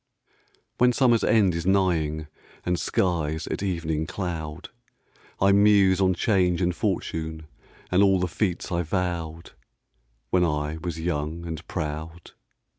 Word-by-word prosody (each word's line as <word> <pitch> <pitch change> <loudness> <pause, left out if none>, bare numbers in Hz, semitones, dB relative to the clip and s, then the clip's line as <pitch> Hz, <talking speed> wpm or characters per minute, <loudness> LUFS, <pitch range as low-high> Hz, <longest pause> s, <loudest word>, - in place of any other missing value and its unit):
When 125 0 +5
summer's 120 -3 +3
end 105 -5 +4
is 85 +1 -3
nighing 80 -6 +1 0.4
And 90 -1 0
skies 80 -4 0
at - - -4
evening 80 -5 -2
cloud, 85 -3 -5 0.7
I 100 +1 +4
muse 100 -2 +5
on 95 -1 +3
change 90 -4 +2
and 90 -1 0
fortune 80 0 -3 0.5
And 90 +2 +4
all 95 -2 +4
the 90 - 0
feats 90 0 -2
I 85 -1 +1
vowed 85 -2 -3 0.8
When 90 -1 +3
I 75 -1 -1
was 85 -3 -4
young 80 0 -3
and 80 -1 -5
proud. 80 +1 -5
85 Hz, 130 wpm, -25 LUFS, 80-95 Hz, 0.8 s, When